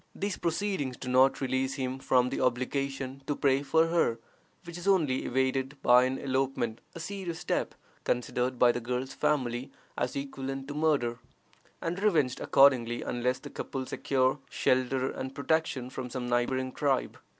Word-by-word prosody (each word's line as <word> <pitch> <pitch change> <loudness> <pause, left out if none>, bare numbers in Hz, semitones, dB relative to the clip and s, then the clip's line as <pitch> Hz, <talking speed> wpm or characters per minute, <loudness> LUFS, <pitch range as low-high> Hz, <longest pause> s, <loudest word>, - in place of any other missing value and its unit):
These 200 0 -2
proceedings 170 -7 -1
do 130 - -8
not 130 +2 +4
release 130 0 0
him 130 -1 -3
from 125 -1 +3
the 135 - -3
obligation 135 +1 -1
to 145 - 0
pay 135 -1 +2
for 160 +3 +3
her, 165 -9 +2 0.5
which 170 -2 -9
is 175 +2 -6
only 155 -10 +2
evaded 130 +2 0
by 125 +1 +6
an 130 +1 -1
elopement, 130 -4 -1
a - - -6
serious 180 -1 -5
step, - - -2 0.3
considered 125 +1 -1
by 120 0 +6
the 120 - -3
girl's 125 +3 -3
family 125 -3 0 0.3
as 125 +1 -2
equivalent 135 -1 -4
to - - -4
murder, 145 -6 +1 0.6
and 175 +3 -2
revenged 155 -12 +2
accordingly, 125 -4 +4
unless 125 +1 -1
the - - -10
couple 135 -1 -4
secure 130 +1 +1
shelter 130 +1 +1
and 130 +1 -6
protection 140 -3 0
from 130 -1 -5
some 125 0 -4
neighboring 130 +2 0
tribe. 140 -1 0
130 Hz, 160 wpm, -29 LUFS, 125-145 Hz, 0.6 s, by